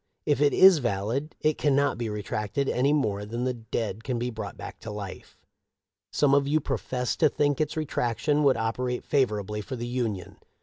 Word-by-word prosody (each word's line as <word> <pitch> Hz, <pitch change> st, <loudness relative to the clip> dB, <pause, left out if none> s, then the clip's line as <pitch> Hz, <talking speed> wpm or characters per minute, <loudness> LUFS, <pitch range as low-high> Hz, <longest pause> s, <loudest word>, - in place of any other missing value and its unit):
If 145 Hz, -2 st, +1 dB
it 145 Hz, -1 st, +5 dB
is 190 Hz, -4 st, +7 dB
valid, 120 Hz, +5 st, -2 dB
it 155 Hz, 0 st, +1 dB
cannot 140 Hz, -3 st, +2 dB
be 115 Hz, -2 st, -2 dB
retracted 105 Hz, +5 st, -2 dB
any 135 Hz, +3 st, +2 dB
more 105 Hz, -9 st, 0 dB
than 115 Hz, +4 st, -4 dB
the 130 Hz, 0 st, 0 dB
dead 115 Hz, -2 st, -4 dB
can 125 Hz, -1 st, -2 dB
be 120 Hz, +1 st, -2 dB
brought 110 Hz, -4 st, -6 dB, 0.2 s
to 115 Hz, -, -8 dB
life. 105 Hz, -3 st, -8 dB, 0.7 s
Some 140 Hz, -2 st, +3 dB
of 140 Hz, 0 st, +3 dB
you 155 Hz, +2 st, +3 dB
profess 125 Hz, -3 st, -2 dB
to 155 Hz, -, +4 dB
think 145 Hz, 0 st, +1 dB
its 155 Hz, +1 st, -2 dB
retraction 145 Hz, -1 st, 0 dB
would 135 Hz, -4 st, +4 dB
operate 125 Hz, +2 st, -2 dB
favorably 105 Hz, -7 st, 0 dB
for 130 Hz, -, -6 dB
the 120 Hz, -1 st, -4 dB
Union. 115 Hz, -7 st, -3 dB
125 Hz, 180 wpm, -27 LUFS, 110-140 Hz, 0.7 s, is